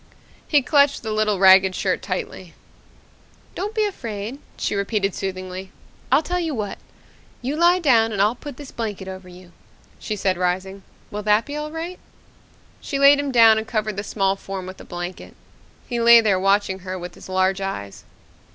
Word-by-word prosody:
He 290 -3 +3
clutched 285 -1 +3
the 220 - -3
little 215 -1 +1
ragged 190 0 +6
shirt 185 -2 -1
tightly. 185 -2 -5 1.0
"Don't 415 +4 -4
be 435 -1 +2
afraid," 230 - -5 0.2
she - - -2
repeated 200 -1 -1
soothingly. 185 0 -6 0.4
"I'll 275 +4 +4
tell 360 +3 -2
you 325 -4 -2
what. 210 -3 -4 0.6
You 270 +4 -2
lie 345 +3 +4
down 235 -10 +3
and 205 - -4
I'll 210 +3 +3
put 270 +1 -10
this 285 -2 -10
blanket 205 -4 -5
over 185 -1 -8
you," 180 0 -15 0.5
she 215 - -4
said, 190 -3 -1
rising. 185 +2 -2 0.3
"Will 210 - -4
that 210 +1 +2
be 290 - -6
all 300 0 -4
right?" 330 +3 -6 0.8
She 280 - -4
laid 280 +1 +6
him 285 -1 -2
down 225 -3 +6
and 220 - -7
covered 215 -2 -2
the 200 - -4
small 195 -2 0
form 195 -1 -7
with 185 +1 -9
a - - -12
blanket. 175 0 -7 0.5
He 240 -1 -2
lay 235 0 +8
there 205 -4 +2
watching 195 0 +1
her 185 0 -6
with 180 0 -8
his - - -13
large 190 +1 +1
eyes. 100 - -5
210 Hz, 180 wpm, -22 LUFS, 190-265 Hz, 1.0 s, lay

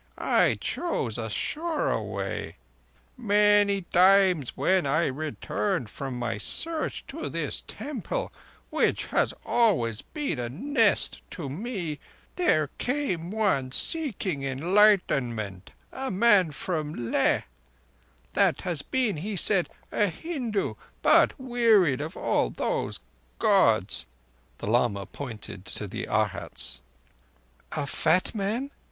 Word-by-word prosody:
I - - +3
chose 125 - -2
a 110 -1 -3
surer 315 - -1
way. - - -4 0.6
Many 205 -2 +4
times 185 -5 +4
when 185 -6 +2
I 155 +5 +2
returned 155 - -2
from 135 -3 -5
my 115 -3 -2
Search 320 - -2
to - - -5
this - - -2
Temple, 300 - -4 0.4
which - - +1
has - - +3
always 125 - +2
been 295 - -4
a 120 -1 -3
nest 225 - +2
to 150 -6 -6
me, 175 - -4 0.4
there 155 - +2
came 245 - -1
one 190 -12 +1
seeking 200 - -1
Enlightenment—a 135 - +1
man 200 -3 +4
from 150 -6 -3
Leh—that - - -1
had 170 -5 -2
been, 250 -9 +1
he 200 +7 -4
said, 190 -1 +2 0.2
a 210 - +2
Hindu, 235 - -3 0.3
but - - +5
wearied 225 - +3
of 155 +2 -6
all - - +1
those - - -2 0.4
Gods." - - +3 0.5
The - - -7
lama 105 -3 +1
pointed 110 -8 -8
to 105 - -5
the 95 - -5
Arhats. 110 - -1 0.9
"A 145 -2 -2
fat 165 +5 +1
man?" 225 +7 -2
180 Hz, 110 wpm, -27 LUFS, -, 0.9 s, but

